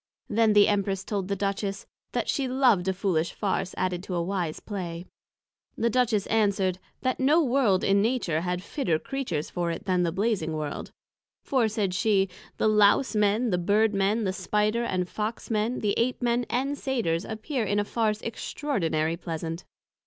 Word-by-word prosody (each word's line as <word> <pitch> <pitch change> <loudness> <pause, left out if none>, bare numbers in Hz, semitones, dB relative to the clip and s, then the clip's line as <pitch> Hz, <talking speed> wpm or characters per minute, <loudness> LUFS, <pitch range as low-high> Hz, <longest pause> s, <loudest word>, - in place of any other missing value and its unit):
Then 220 0 +3
the 205 -1 +6
Empress 195 -2 0
told 200 -2 -3
the 200 - -1
Duchess, 200 0 -2 0.3
That - - -1
she 275 -2 0
loved 250 -8 +3
a 190 - +2
foolish 180 -4 -1
Farse 190 -2 -1
added 180 -1 -1
to 185 -1 -5
a 170 - 0
wise 175 -4 -2
Play. 175 -4 -5 0.7
The 235 +1 +1
Duchess 225 -4 +2
answered, 200 -4 +1 0.2
That 255 -1 0
no 300 +6 +4
World 245 -8 +2
in 200 0 +3
Nature 210 -9 0
had 180 +1 -2
fitter 205 - 0
Creatures 185 - -3
for 175 -1 -1
it 170 +5 -4
than 185 -2 +2
the 170 -1 +1
Blazing 190 -4 0
World: 150 -2 -4 0.5
for, 255 -5 +2
said 210 -3 -1
she, 195 -1 +2 0.3
the - - +2
Lowse 210 +3 +4
men, 210 +3 +2
the 180 - +1
Bird 210 +4 +2
men, 200 +3 +1
the 190 -2 0
Spider 210 +4 0
and 185 -5 -1
Fox 215 +4 -4
men, 220 +3 0
the 205 -2 +1
Ape 245 +2 +1
men 240 0 +1
and 275 +3 -1
Satyrs 215 - 0
appear 225 +4 -3
in 205 -1 0
a 205 - +1
Farse 215 -1 -1
extraordinary 165 - -1
pleasant. 165 0 -5
205 Hz, 175 wpm, -27 LUFS, 180-230 Hz, 0.7 s, the